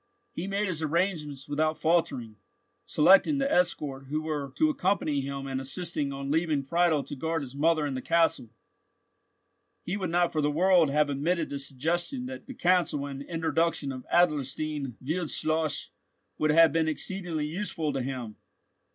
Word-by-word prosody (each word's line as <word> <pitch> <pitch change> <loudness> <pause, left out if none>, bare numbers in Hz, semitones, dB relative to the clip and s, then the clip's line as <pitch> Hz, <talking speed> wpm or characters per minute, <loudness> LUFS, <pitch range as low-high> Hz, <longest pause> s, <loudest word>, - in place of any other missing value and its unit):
He 175 - -4
made 200 +1 0
his 175 -5 -2
arrangements 155 -4 -1
without 155 +2 0
faltering, 130 -10 0 0.5
selecting 195 - +5
the 275 0 0
escort 140 -6 0
who 150 +3 -1
were 145 -3 -3
to 310 -1 +3
accompany 190 - 0
him, 135 0 -5
and 135 -1 -3
insisting 150 0 -2
on 140 0 -4
leaving 155 -3 +1
Friedel 165 0 +2
to 140 - -7
guard 160 +2 -2
his 130 -1 -9
mother 155 +1 +2
and 140 -2 -3
the 130 - -3
castle. 165 -7 +1 1.3
He 180 - -3
would 185 -4 -3
not 175 0 +2
for 155 - 0
the 145 - +2
world 175 +1 +4
have 150 +1 +2
admitted 160 +4 0
the 140 - -4
suggestion 170 - -2
that 265 +1 -8
the 265 - -8
counsel 175 -7 +2
and 140 -1 -6
introduction 165 -2 -1
of 130 -1 -8
Adlerstein 150 -4 +1
Wildschloss 155 -1 0 0.5
would 155 - +2
have 160 0 +6
been 160 -1 +2
exceedingly 165 -1 -2
useful 160 -2 -2
to 135 - -1
him. 125 -4 -5
155 Hz, 160 wpm, -28 LUFS, 140-175 Hz, 1.3 s, have